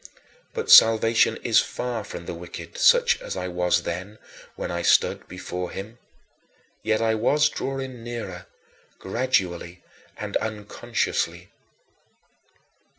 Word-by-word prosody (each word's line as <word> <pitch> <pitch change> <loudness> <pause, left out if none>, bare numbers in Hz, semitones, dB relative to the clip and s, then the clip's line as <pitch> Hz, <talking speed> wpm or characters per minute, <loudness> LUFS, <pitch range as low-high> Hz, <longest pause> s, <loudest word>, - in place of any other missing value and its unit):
But 460 -1 -1
"salvation 115 0 +6
is - - +4
far 120 -3 -3
from 85 -3 -8
the - - -5
wicked," 85 +1 -9
such 485 -1 +4
as - - -5
I 90 0 -3
was 90 0 +1
then 95 +5 -5 0.4
when - - -4
I 85 0 -2
stood - - +2
before 90 0 -5
him. 110 +5 -8 0.8
Yet 110 +1 0
I 110 0 +2
was 145 +7 +3
drawing 135 -3 -5
nearer, 115 -7 -6 0.5
gradually 95 -6 -2 0.3
and - - -2
unconsciously. 105 -1 -3
110 Hz, 115 wpm, -24 LUFS, 90-120 Hz, 0.8 s, salvation